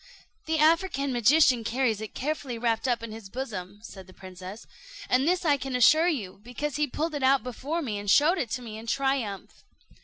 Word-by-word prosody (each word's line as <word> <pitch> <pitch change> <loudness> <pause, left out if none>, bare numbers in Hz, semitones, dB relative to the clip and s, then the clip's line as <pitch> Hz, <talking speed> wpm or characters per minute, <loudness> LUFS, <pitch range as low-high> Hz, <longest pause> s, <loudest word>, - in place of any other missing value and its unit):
"The 320 0 +1
African 310 -3 +2
magician 250 0 +4
carries 230 -2 0
it 220 - -8
carefully 275 -4 -3
wrapt 230 +1 0
up 240 -2 0
in 230 - -6
his 215 -3 -10
bosom," 205 -5 -6
said 190 -4 -11
the 185 - -16
princess; 185 +3 -10 0.4
"and 260 +3 +2
this 360 0 +1
I 290 -3 +4
can 265 -1 -4
assure 310 +7 +5
you, 210 - -3
because 255 +5 -4
he 300 0 +1
pulled 310 +4 -3
it 290 - -3
out 265 +1 +3
before 280 +7 -4
me, 215 -6 -3
and 205 0 -5
showed 310 - +4
it 245 - -2
to 250 - -3
me 220 -2 -8
in 225 - -11
triumph." 230 -7 -2
250 Hz, 205 wpm, -27 LUFS, 220-290 Hz, 0.4 s, assure